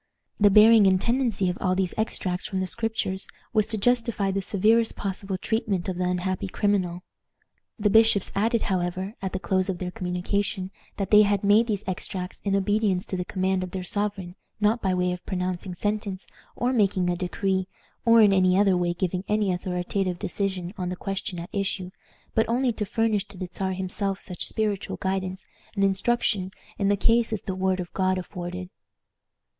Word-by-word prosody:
The 205 Hz, -1 st, +6 dB
bearing 215 Hz, +1 st, +7 dB
and 190 Hz, -1 st, +4 dB
tendency 235 Hz, -4 st, +1 dB
of 180 Hz, -, -2 dB
all 185 Hz, -1 st, +1 dB
these 185 Hz, -2 st, 0 dB
extracts 185 Hz, -4 st, -1 dB
from 190 Hz, -, -2 dB
the 185 Hz, -, 0 dB
Scriptures 220 Hz, -2 st, -1 dB, 0.3 s
was 215 Hz, -2 st, +3 dB
to 220 Hz, -1 st, -3 dB
justify 230 Hz, -3 st, +1 dB
the 195 Hz, +1 st, -1 dB
severest 220 Hz, +4 st, +2 dB
possible 195 Hz, -1 st, -3 dB
treatment 205 Hz, -3 st, -1 dB
of 185 Hz, -2 st, -2 dB
the 180 Hz, -, +1 dB
unhappy 180 Hz, +1 st, -1 dB
criminal. 185 Hz, -3 st, 0 dB, 0.7 s
The 210 Hz, -2 st, +1 dB
bishops 220 Hz, -2 st, +5 dB
added, 225 Hz, +3 st, +1 dB
however, 185 Hz, +1 st, -2 dB
at 190 Hz, -1 st, -3 dB
the -, -, -2 dB
close 185 Hz, 0 st, 0 dB
of 185 Hz, -, -1 dB
their 180 Hz, 0 st, -4 dB
communication, 185 Hz, +1 st, -2 dB, 0.3 s
that 195 Hz, -, -3 dB
they 210 Hz, 0 st, +9 dB
had 205 Hz, -1 st, +2 dB
made 210 Hz, +3 st, +5 dB
these 210 Hz, -3 st, -1 dB
extracts 185 Hz, 0 st, -4 dB
in 200 Hz, -1 st, +1 dB
obedience 200 Hz, -1 st, +1 dB
to -, -, -4 dB
the 180 Hz, -, -2 dB
command 190 Hz, 0 st, -1 dB
of 185 Hz, -, -4 dB
their 185 Hz, 0 st, -5 dB
sovereign, 200 Hz, -2 st, -2 dB, 0.3 s
not 215 Hz, +3 st, +2 dB
by 190 Hz, -1 st, +1 dB
way 180 Hz, 0 st, +1 dB
of 180 Hz, 0 st, -5 dB
pronouncing 180 Hz, -1 st, -3 dB
sentence, 205 Hz, -1 st, -2 dB, 0.3 s
or 250 Hz, +2 st, 0 dB
making 195 Hz, -5 st, +2 dB
a 175 Hz, -, +1 dB
decree, 190 Hz, +1 st, -1 dB, 0.4 s
or 230 Hz, -1 st, +6 dB
in 205 Hz, -2 st, +6 dB
any 185 Hz, -1 st, +4 dB
other 195 Hz, -2 st, +4 dB
way 175 Hz, -1 st, 0 dB
giving 185 Hz, 0 st, -2 dB
any 210 Hz, -3 st, +1 dB
authoritative 180 Hz, +1 st, -2 dB
decision 185 Hz, -1 st, -2 dB
on 180 Hz, -1 st, -2 dB
the 180 Hz, -, -3 dB
question 195 Hz, -1 st, -4 dB
at 170 Hz, +1 st, -6 dB
issue, 195 Hz, -2 st, -2 dB, 0.4 s
but 225 Hz, -, +2 dB
only 245 Hz, +1 st, +1 dB
to 210 Hz, -, -3 dB
furnish 215 Hz, -1 st, 0 dB
to 200 Hz, -, -11 dB
the 185 Hz, -, -4 dB
Czar 190 Hz, +1 st, -3 dB
himself 190 Hz, +1 st, -2 dB
such 180 Hz, -2 st, -3 dB
spiritual 210 Hz, -3 st, -2 dB
guidance 190 Hz, 0 st, -3 dB, 0.3 s
and 200 Hz, -, +1 dB
instruction 195 Hz, 0 st, +1 dB, 0.3 s
in 200 Hz, -, +2 dB
the 200 Hz, 0 st, +3 dB
case 230 Hz, +2 st, +3 dB
as 220 Hz, -, -3 dB
the 190 Hz, -, -3 dB
word 185 Hz, 0 st, 0 dB
of 175 Hz, -1 st, -6 dB
God 185 Hz, -1 st, +1 dB
afforded. 180 Hz, 0 st, -6 dB
190 Hz, 185 wpm, -25 LUFS, 185-210 Hz, 0.7 s, they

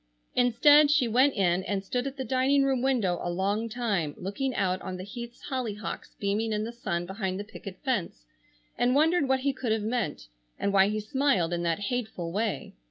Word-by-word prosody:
Instead 290 Hz, +5 st, +6 dB
she 295 Hz, -4 st, +3 dB
went 255 Hz, +5 st, +3 dB
in 185 Hz, -2 st, +2 dB
and 195 Hz, -1 st, -2 dB
stood 245 Hz, +6 st, -2 dB
at 275 Hz, +1 st, -6 dB
the 265 Hz, -, -3 dB
dining 270 Hz, +2 st, +3 dB
room 265 Hz, -2 st, +1 dB
window 230 Hz, -10 st, +1 dB
a -, -, -2 dB
long 200 Hz, +6 st, -1 dB
time 205 Hz, -11 st, -1 dB
looking 245 Hz, +8 st, -3 dB
out 185 Hz, -2 st, 0 dB
on 185 Hz, -, -5 dB
the 185 Hz, -, -6 dB
Heaths' 235 Hz, +3 st, -9 dB
hollyhocks 225 Hz, -6 st, -4 dB
beaming 210 Hz, +2 st, 0 dB
in 210 Hz, 0 st, -1 dB
the 225 Hz, -, -4 dB
sun 190 Hz, -8 st, -3 dB
behind 190 Hz, 0 st, -3 dB
the -, -, -3 dB
picket 200 Hz, -2 st, -10 dB
fence, 205 Hz, -, -2 dB, 0.5 s
and 245 Hz, +2 st, +3 dB
wondered 315 Hz, 0 st, +3 dB
what 265 Hz, 0 st, +2 dB
he 275 Hz, +1 st, +1 dB
could 255 Hz, -3 st, -3 dB
have 220 Hz, -1 st, +1 dB
meant, 215 Hz, -, -2 dB, 0.3 s
and 200 Hz, -, -1 dB
why 195 Hz, 0 st, +6 dB
he 215 Hz, +1 st, -1 dB
smiled 215 Hz, -, +1 dB
in 170 Hz, -, -1 dB
that 170 Hz, +2 st, 0 dB
hateful 220 Hz, -9 st, -3 dB
way. 215 Hz, +3 st, -2 dB
220 Hz, 200 wpm, -28 LUFS, 190-255 Hz, 0.5 s, Instead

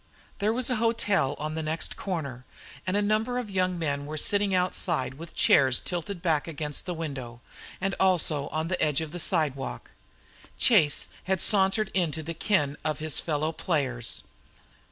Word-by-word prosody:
There 210 Hz, +2 st, +2 dB
was 250 Hz, +2 st, 0 dB
a 250 Hz, -, +2 dB
hotel 205 Hz, -10 st, +2 dB
on 155 Hz, +1 st, -3 dB
the 160 Hz, -, -2 dB
next 160 Hz, +1 st, -2 dB
corner, 140 Hz, -10 st, -4 dB, 0.4 s
and 185 Hz, +2 st, +2 dB
a 205 Hz, -, +2 dB
number 220 Hz, +4 st, +1 dB
of 240 Hz, -5 st, -3 dB
young 185 Hz, -1 st, +1 dB
men 145 Hz, -3 st, -2 dB
were 155 Hz, +1 st, -4 dB
sitting 205 Hz, +5 st, +2 dB
outside 175 Hz, -6 st, +1 dB
with 160 Hz, +5 st, -10 dB
chairs 130 Hz, -3 st, +5 dB
tilted 175 Hz, +1 st, -4 dB
back 160 Hz, -4 st, +2 dB
against 150 Hz, 0 st, -4 dB
the 180 Hz, -, -2 dB
window, 135 Hz, -7 st, -5 dB, 0.4 s
and 195 Hz, +1 st, -1 dB
also 160 Hz, -6 st, +2 dB
on 160 Hz, +1 st, -2 dB
the 185 Hz, +1 st, -1 dB
edge 150 Hz, -1 st, +2 dB
of 160 Hz, -2 st, -5 dB
the 175 Hz, -, -5 dB
sidewalk. 150 Hz, -6 st, -1 dB, 0.7 s
Chase 170 Hz, -, +4 dB, 0.2 s
had 190 Hz, -1 st, +1 dB
sauntered 195 Hz, +1 st, +3 dB
into 160 Hz, -4 st, 0 dB
the 165 Hz, +2 st, -4 dB
ken 150 Hz, -5 st, +1 dB
of 155 Hz, 0 st, -1 dB
his 155 Hz, -2 st, -1 dB
fellow 155 Hz, 0 st, -1 dB
players. 135 Hz, -9 st, -2 dB
165 Hz, 170 wpm, -28 LUFS, 150-190 Hz, 0.7 s, chairs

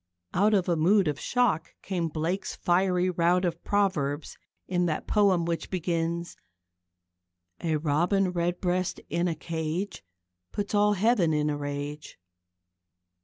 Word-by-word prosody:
Out 210 Hz, +3 st, +4 dB
of 190 Hz, -3 st, +1 dB
a 175 Hz, -, +2 dB
mood 185 Hz, +4 st, +4 dB
of 145 Hz, -1 st, -1 dB
shock 240 Hz, -10 st, 0 dB
came 175 Hz, -4 st, -1 dB
Blake's 165 Hz, +5 st, -2 dB
fiery 180 Hz, 0 st, +2 dB
rout 175 Hz, +1 st, +2 dB
of 170 Hz, -1 st, -3 dB
proverbs 160 Hz, -8 st, 0 dB, 0.3 s
in 180 Hz, -1 st, +1 dB
that 155 Hz, -, -2 dB
poem 195 Hz, -5 st, +3 dB
which 170 Hz, -1 st, -2 dB
begins: 170 Hz, -1 st, -2 dB, 1.2 s
A 160 Hz, -2 st, 0 dB
Robin 170 Hz, +6 st, +1 dB
Redbreast 180 Hz, +1 st, -1 dB
in 170 Hz, +1 st, +1 dB
a 165 Hz, -, -1 dB
cage 165 Hz, -, -4 dB, 0.5 s
Puts 205 Hz, 0 st, -3 dB
all 210 Hz, 0 st, +4 dB
heaven 200 Hz, -5 st, +2 dB
in 150 Hz, 0 st, +1 dB
a -, -, -1 dB
rage. 145 Hz, +1 st, -5 dB
175 Hz, 130 wpm, -27 LUFS, 160-190 Hz, 1.2 s, Out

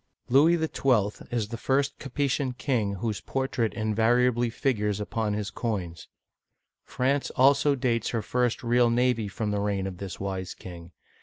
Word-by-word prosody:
Louis 150 Hz, +7 st, +5 dB
XII. 125 Hz, -10 st, 0 dB
is 115 Hz, -4 st, -2 dB
the 115 Hz, -1 st, -6 dB
first 140 Hz, +1 st, 0 dB
Capetian 135 Hz, -1 st, -1 dB
king 110 Hz, -9 st, 0 dB
whose 105 Hz, +1 st, -3 dB
portrait 130 Hz, -4 st, -1 dB
inva 110 Hz, -1 st, -1 dB, 0.2 s
riably 120 Hz, -1 st, +2 dB
figures 105 Hz, -5 st, 0 dB
upon 105 Hz, 0 st, -2 dB
his 105 Hz, -2 st, -3 dB
coins. 90 Hz, -9 st, -4 dB, 0.8 s
France 135 Hz, +2 st, 0 dB
also 140 Hz, +2 st, +4 dB
dates 120 Hz, -4 st, 0 dB
her 115 Hz, -3 st, -2 dB
first 125 Hz, +2 st, 0 dB
real 120 Hz, 0 st, +3 dB
navy 120 Hz, -2 st, +1 dB
from 105 Hz, +1 st, -3 dB
the 100 Hz, 0 st, -1 dB
reign 100 Hz, -2 st, -1 dB
of 95 Hz, -2 st, -6 dB
this 95 Hz, -2 st, -6 dB
wise 95 Hz, -2 st, -4 dB
king. 85 Hz, -1 st, -10 dB
115 Hz, 155 wpm, -27 LUFS, 105-130 Hz, 0.8 s, Louis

